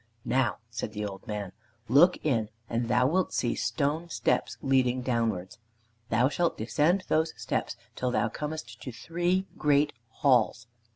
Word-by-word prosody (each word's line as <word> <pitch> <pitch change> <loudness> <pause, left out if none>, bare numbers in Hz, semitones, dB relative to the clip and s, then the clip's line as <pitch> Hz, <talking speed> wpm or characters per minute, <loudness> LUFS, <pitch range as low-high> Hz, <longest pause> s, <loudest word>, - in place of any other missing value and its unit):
"Now," 130 -2 +1
said 115 -2 -4
the 105 -1 -3
old 95 -2 -7
man, 105 -3 -4 0.4
"look 150 +9 +6
in 115 -8 +1 0.2
and 115 +1 -1
thou 125 +1 +3
wilt 180 +7 +1
see 120 - +1
stone 145 +8 -1
steps - - 0
leading 130 -2 +2
downwards. 110 -5 -1 0.5
Thou 120 +3 +3
shalt 170 +4 0
descend 150 - +2
those 160 +1 0
steps - - -2 0.2
until 125 - -2
thou 120 -1 +1
comest 125 -3 -6
to 130 - -6
three 175 +8 -1
great 145 0 +3 0.2
halls. 120 -3 +2
125 Hz, 150 wpm, -28 LUFS, 115-150 Hz, 0.5 s, look